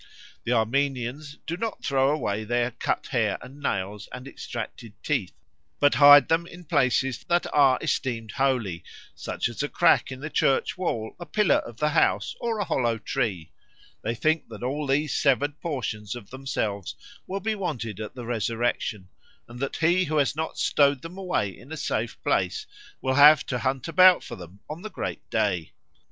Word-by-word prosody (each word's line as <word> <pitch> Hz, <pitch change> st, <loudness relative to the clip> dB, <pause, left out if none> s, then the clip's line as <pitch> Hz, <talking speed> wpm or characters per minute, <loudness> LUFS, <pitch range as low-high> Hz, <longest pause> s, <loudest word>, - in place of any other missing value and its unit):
The 120 Hz, -, +1 dB
Armenians 135 Hz, +4 st, -1 dB
do 170 Hz, -, -3 dB
not 225 Hz, +1 st, -4 dB
throw 135 Hz, -1 st, +3 dB
away 110 Hz, -8 st, -1 dB
their 120 Hz, +2 st, 0 dB
cut -, -, -2 dB
hair -, -, +1 dB
and 135 Hz, +3 st, -12 dB
nails 100 Hz, -4 st, -3 dB
and 125 Hz, +2 st, -8 dB
extracted 115 Hz, -4 st, -7 dB
teeth, -, -, -1 dB, 0.4 s
but 145 Hz, -, +4 dB
hide 145 Hz, -1 st, +8 dB
them 165 Hz, +1 st, +1 dB
in 175 Hz, +1 st, -12 dB
places 130 Hz, -2 st, +1 dB
that 175 Hz, 0 st, +1 dB
are 140 Hz, -3 st, +5 dB
esteemed 115 Hz, -4 st, -2 dB
holy, 115 Hz, -10 st, 0 dB, 0.3 s
such -, -, -3 dB
as -, -, -5 dB
a -, -, -2 dB
crack -, -, +3 dB
in 130 Hz, -, -7 dB
the 155 Hz, +3 st, -6 dB
church 135 Hz, -, +2 dB
wall, 115 Hz, -12 st, -3 dB
a 175 Hz, -, -8 dB
pillar 210 Hz, -7 st, +3 dB
of 120 Hz, -, -6 dB
the 150 Hz, -, +1 dB
house, 155 Hz, -, +2 dB
or 230 Hz, -2 st, -1 dB
a 205 Hz, -, 0 dB
hollow 120 Hz, -7 st, 0 dB
tree. 90 Hz, -6 st, -3 dB, 0.5 s
They 115 Hz, +6 st, -2 dB
think 155 Hz, +6 st, +1 dB
that 110 Hz, 0 st, -9 dB
all 145 Hz, +4 st, -2 dB
these 145 Hz, +2 st, +1 dB
severed 145 Hz, +1 st, +1 dB
portions 120 Hz, -9 st, -3 dB
of 120 Hz, -3 st, -11 dB
themselves 110 Hz, -7 st, -3 dB, 0.3 s
will 195 Hz, +1 st, -3 dB
be 220 Hz, +3 st, -1 dB
wanted 125 Hz, -, -4 dB
at 110 Hz, +2 st, -6 dB
the 125 Hz, -2 st, -7 dB
resurrection, 115 Hz, -3 st, -2 dB, 0.4 s
and 120 Hz, +1 st, -11 dB
that 140 Hz, +1 st, -3 dB
he 175 Hz, +3 st, +3 dB
who 155 Hz, -1 st, -1 dB
has 145 Hz, 0 st, +2 dB
not 160 Hz, +1 st, -3 dB
stowed 140 Hz, -2 st, +2 dB
them 175 Hz, +3 st, -8 dB
away 175 Hz, -, -1 dB
in 130 Hz, +5 st, -15 dB
a 160 Hz, -, -5 dB
safe -, -, -2 dB
place 430 Hz, -, 0 dB, 0.4 s
will 130 Hz, -, 0 dB
have 150 Hz, +2 st, +7 dB
to 125 Hz, -, -2 dB
hunt 130 Hz, +2 st, -1 dB
about 185 Hz, +2 st, +6 dB
for -, -, -7 dB
them 90 Hz, +2 st, -12 dB
on 155 Hz, +3 st, -7 dB
the 215 Hz, -, -6 dB
great -, -, -6 dB
day. 100 Hz, -7 st, 0 dB
135 Hz, 180 wpm, -26 LUFS, 115-155 Hz, 0.5 s, hide